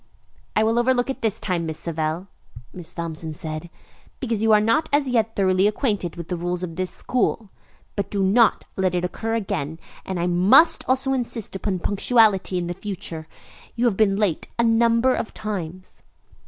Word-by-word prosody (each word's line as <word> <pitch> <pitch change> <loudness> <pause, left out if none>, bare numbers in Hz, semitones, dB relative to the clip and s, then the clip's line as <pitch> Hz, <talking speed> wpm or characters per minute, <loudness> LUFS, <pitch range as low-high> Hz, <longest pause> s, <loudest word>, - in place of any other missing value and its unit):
"I 215 - +4
will 225 +2 +2
overlook 250 +1 +2
it - - -8
this 220 -2 0
time, 175 -4 -2
Miss 160 -1 -4
Savell," 160 +1 -3 0.5
Miss 175 -3 -5
Thompson 165 -2 -4
said, 155 +2 -6 0.5
"because 230 -5 -1
you 225 0 +3
are 210 - +7
not 230 +9 +1
as 280 -2 +2
yet 225 -2 +1
thoroughly 190 0 +3
acquainted 210 - -1
with 170 -2 -7
the 180 - -2
rules 175 +1 -2
of 165 -2 -5
this 185 +1 -1
school, 230 -4 -1 0.4
but 200 - -2
do 200 -1 0
not 215 +4 +3
let 185 -2 0
it 175 0 0
occur 225 +5 -3
again. 160 -8 -3 0.3
And 190 -2 -4
I 170 - 0
must 190 - +5
also 265 +1 +2
insist 235 -5 -2
upon 190 0 -2
punctuality 205 -2 +3
in 175 0 -2
future. 175 -5 -6 0.5
You 240 - 0
have 230 -5 +2
been 195 -1 +3
late 200 -5 0
a 235 - +3
number 230 +2 +3
of 225 - -4
times." 185 -4 -6
200 Hz, 180 wpm, -23 LUFS, 175-230 Hz, 0.5 s, are